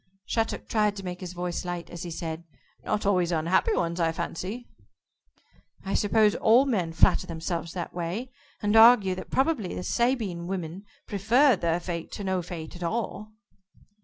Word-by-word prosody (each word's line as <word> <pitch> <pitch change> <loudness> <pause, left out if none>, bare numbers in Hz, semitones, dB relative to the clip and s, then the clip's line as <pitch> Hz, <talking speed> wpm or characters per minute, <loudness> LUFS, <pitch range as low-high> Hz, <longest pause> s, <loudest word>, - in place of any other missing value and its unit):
Shattuck 225 -1 -2
tried 210 -2 +1
to 195 -1 -7
make 180 0 -5
his 180 -1 -7
voice 175 -1 -3
light, 175 -1 -5
as 170 - -7
he 175 - -5
said: 165 0 -5 0.4
"Not 210 -1 -1
always 180 -3 +2
unhappy 170 - +2
ones, 170 +1 -1
I 165 -1 +2
fancy." 185 +8 -5 1.2
"I 195 - -2
suppose 210 0 +3
all 235 +5 +4
men 190 -11 0
flatter 170 +2 +3
themselves 165 0 -4
that 175 -2 -5
way, 180 +9 -4 0.3
and 205 +1 +2
argue 225 -4 +7
that 185 - -7
probably 265 - 0
the - - -4
Sabine 220 -9 0
women 185 +1 -5 0.2
preferred 225 +4 +3
their 170 0 +1
fate 170 -2 -5
to 205 - -5
no 190 -1 0
fate 165 -2 -7
at 175 - -11
all." 215 +3 -3
185 Hz, 165 wpm, -27 LUFS, 170-215 Hz, 1.2 s, argue